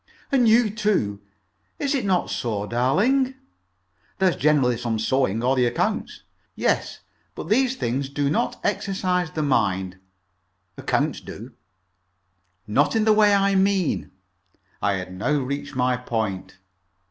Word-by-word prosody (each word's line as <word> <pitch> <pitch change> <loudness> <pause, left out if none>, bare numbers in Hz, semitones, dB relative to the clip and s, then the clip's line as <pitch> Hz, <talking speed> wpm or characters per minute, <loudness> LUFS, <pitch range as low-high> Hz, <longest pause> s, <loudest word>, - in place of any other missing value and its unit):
"And 255 -4 +4
you, 225 -1 +4
too. 200 - 0 0.6
Is 285 0 -1
it 270 -6 -1
not 185 -3 +1
so, 105 -4 -2
darling?" 210 - +1 0.8
"There's 190 -2 +2
generally 140 -5 +2
some 115 -1 -2
sewing, 115 -1 0
or 130 +2 +2
the 125 -2 +3
accounts." - - -2 0.3
"Yes; - - -1 0.3
but 160 - -7
these 260 +3 +2
things 135 - -2
do 145 0 -1
not 150 - -1
exercise 185 -3 -1
the 155 0 -3
mind." 95 -9 0 0.8
"Accounts - - -1
do." - - -10 1.1
"Not 140 - +1
in 220 -1 +2
the 215 - +5
way 210 -1 +5
I 200 0 +2
mean." 190 - +1 0.7
I 100 - +1
had 90 -1 -5
now 105 +11 -1
reached 145 +1 -3
my 125 0 +1
point. 110 -7 -4
145 Hz, 135 wpm, -23 LUFS, -, 1.1 s, the